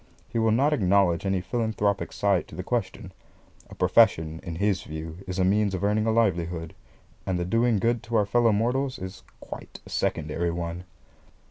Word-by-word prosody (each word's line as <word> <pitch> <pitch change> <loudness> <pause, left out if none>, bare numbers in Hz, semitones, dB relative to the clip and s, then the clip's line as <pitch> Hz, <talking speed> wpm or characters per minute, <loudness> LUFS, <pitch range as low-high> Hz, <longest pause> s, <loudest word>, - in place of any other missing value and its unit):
He 115 - -1
will 110 0 +3
not 135 +7 +3
acknowledge 95 - +2
any 95 -1 +1
philanthropic 105 -1 -1
side 100 -3 +1
to - - -11
the - - -5
question. - - -3 0.6
A - - -11
profession, 80 0 +3
in 85 - -6
his 100 +1 +1
view, 80 +1 -7
is 90 0 -4
a 95 - +2
means 100 0 +2
of 95 - -4
earning 105 +2 +1
a - - +3
livelihood, 85 -7 0 0.5
and 95 -1 -1
the 90 - -1
doing 115 +3 +2
good 115 +3 +1
to 115 +1 -3
our 105 -2 +4
fellow 115 +2 +3
mortals, 125 +5 0
is 95 +1 -8 0.2
quite - - -9
a - - -12
secondary 80 +3 -1
one. 85 +1 -4
100 Hz, 180 wpm, -26 LUFS, 85-110 Hz, 0.6 s, our